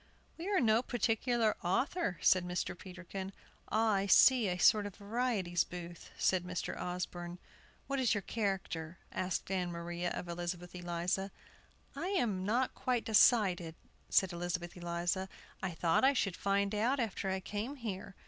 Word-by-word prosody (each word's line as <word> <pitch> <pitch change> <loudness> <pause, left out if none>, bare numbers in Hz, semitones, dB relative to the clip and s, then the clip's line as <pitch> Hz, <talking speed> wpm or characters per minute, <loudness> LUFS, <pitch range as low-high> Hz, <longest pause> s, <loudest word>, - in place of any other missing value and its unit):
"We 345 +4 -5
are 395 -2 +3
no 225 -2 +4
particular 235 -2 +1
author," 190 - 0
said 185 -1 +5
Mr. 180 0 -2
Peterkin. 185 +1 -7 0.4
"Ah, 220 +1 +3
I 195 0 +1
see, 245 +3 +6
a 180 -1 -1
sort 205 +3 +5
of 200 - -10
varieties' 200 -5 0
booth," 175 0 -9
said 185 -2 +2
Mr. 180 -1 -3
Osborne. 175 -1 -4 0.5
"What 275 0 -2
is 245 -4 +3
your 205 - -2
character?" 185 -6 -3
asked 185 0 -2
Ann 180 -2 0
Maria 170 +1 -3
of 180 - -5
Elizabeth 175 0 -4
Eliza. 175 +2 -2 0.7
"I - - -3
have 240 - +2
not 210 +7 0
quite 250 -2 -1
decided," 190 -7 +4 0.3
said 190 -2 +3
Elizabeth 175 0 -3
Eliza. 175 +2 -2 0.3
"I 190 - -1
thought 165 +2 +1
I 270 +1 +6
should 195 -8 0
find 200 +1 +1
out 235 +6 +1
after 210 -4 -1
I 190 0 0
came 210 +8 -4
here. 200 -7 -6
190 Hz, 155 wpm, -34 LUFS, 175-225 Hz, 0.7 s, see